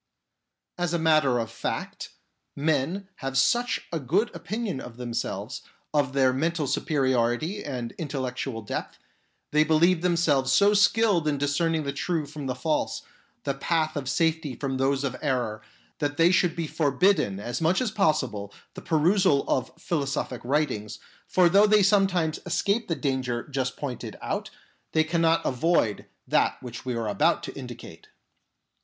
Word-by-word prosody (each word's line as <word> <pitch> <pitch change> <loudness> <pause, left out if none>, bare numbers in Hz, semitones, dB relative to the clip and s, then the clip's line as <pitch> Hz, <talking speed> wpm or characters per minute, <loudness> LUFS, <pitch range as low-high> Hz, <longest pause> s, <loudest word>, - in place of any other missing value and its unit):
As 175 -1 0
a - - +2
matter 155 -6 +3
of 115 -3 -3
fact, - - -4 0.5
men 160 +6 0
have 135 -1 -3
such 240 - +2
a 165 - 0
good 175 - 0
opinion 215 - -3
of 120 -1 -10
themselves, 120 -1 -4 0.3
of 140 -3 +1
their 130 -2 +3
mental 160 +3 0
superiority 130 - 0
and 125 -5 -4
intellectual 130 -5 -4
depth; - - -5 0.5
they 150 +1 +4
believe 165 +2 +3
themselves 165 -7 +2
so 200 +8 +5
skilled 205 -4 +3
in 145 -1 +1
discerning 155 +3 0
the 140 -1 -3
true 160 +2 -1
from 145 -1 -7
the 130 - -2
false, 150 +5 -1 0.4
the 140 - -1
path 155 +3 0
of 140 -3 -3
safety 160 -5 0
from 135 +1 -3
those 135 +1 +1
of 130 -2 -2
error, 125 -7 -1 0.4
that 145 0 -2
they 165 +2 +5
should 180 -3 +2
be 170 -1 -2
forbidden 150 - +1
as 120 +6 -4
much 165 +3 +3
as 245 -5 -1
possible 130 - 0 0.2
the - - -9
perusal 170 -1 +3
of 130 - 0
philosophic 140 -5 -2
writings, 130 -6 -1 0.3
for 180 -1 +4
though 200 +4 +5
they 210 -1 +5
sometimes 185 -5 +2
escape 200 +6 0
the 165 - 0
danger 130 -5 -2
just 130 -2 -2
pointed 130 -5 -5
out, - - -3 0.4
they 160 - +4
cannot 165 0 +2
avoid 130 -5 +1 0.2
that - - +2
which 120 -1 -8
we 125 -2 -2
are 115 -1 -2
about 100 -2 +2
to - - -6
indicate. - - -10
150 Hz, 155 wpm, -26 LUFS, 130-170 Hz, 0.5 s, so